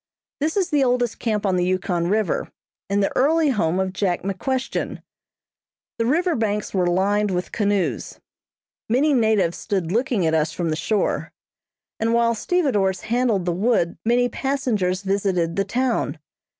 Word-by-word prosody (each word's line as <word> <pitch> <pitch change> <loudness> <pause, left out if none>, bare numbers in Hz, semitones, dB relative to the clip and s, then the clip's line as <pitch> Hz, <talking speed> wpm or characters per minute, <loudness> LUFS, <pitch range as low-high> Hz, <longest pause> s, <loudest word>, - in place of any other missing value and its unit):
This 310 +6 -1
is 375 -4 0
the 290 -2 +3
oldest 245 -2 0
camp 215 -3 -1
on 190 -2 +2
the 180 - +1
Yukon 180 -1 0
River, 210 -2 0 0.4
and 200 0 +2
the - - -1
early 310 +3 +3
home 185 -8 +1
of 190 -1 -1
Jack 185 -3 -1
McQuestion. 250 +7 -3 1.0
The 230 - +1
river 340 +6 +2
banks 210 -2 -1
were 185 -2 +1
lined 200 +4 +1
with 180 -1 -2
canoes; 200 - -1 0.7
many 280 +6 +3
natives 220 -8 +2
stood 190 -6 -2
looking 230 -4 +1
at 160 - +1
us 155 0 +1
from 170 -3 -2
the - - 0
shore, 210 +5 -1 0.7
and 230 +1 +1
while 235 0 +3
stevedores 215 - 0
handled 225 -4 0
the 175 - +1
wood, 180 -2 +1
many 245 +2 +3
passengers 230 -10 -1
visited 190 -4 0
the 195 - 0
town. 250 -8 -1
205 Hz, 155 wpm, -22 LUFS, 185-245 Hz, 1.0 s, the